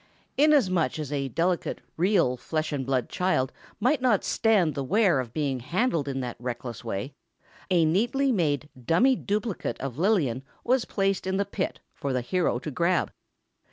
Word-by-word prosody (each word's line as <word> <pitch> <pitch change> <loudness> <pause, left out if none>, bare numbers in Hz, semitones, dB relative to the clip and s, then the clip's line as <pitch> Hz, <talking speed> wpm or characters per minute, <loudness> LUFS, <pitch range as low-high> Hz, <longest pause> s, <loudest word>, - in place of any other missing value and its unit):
Inasmuch 260 - +3
as 150 -3 -5
a 140 -2 -1
delicate, 170 +7 -1 0.2
real 175 -7 +2
flesh 155 +5 -3
and 135 -3 -3
blood, 130 -3 0
child 180 -8 0 0.3
might 255 +6 +2
not 240 -6 +3
stand 205 -9 +2
the 140 - -3
wear 190 - +3
of 120 -3 -4
being 140 -2 -1
handled 165 - 0
in 135 -1 -2
that 125 -1 -5
reckless 120 -2 -5
way, 100 +9 -4 0.6
a 175 -3 +4
neatly 240 - +2
made 150 - 0 0.2
dummy 240 - +4
duplicate 210 -2 -2
of 135 0 -5
Lillian 165 - +2 0.2
was 255 0 +2
placed 195 -2 0
in 190 0 0
the 200 - +1
pit 195 -1 -3
for 140 -2 -3
the 125 - 0
hero 165 +1 0
to 150 +5 -5
grab. 170 +6 +1
170 Hz, 165 wpm, -27 LUFS, 135-200 Hz, 0.6 s, a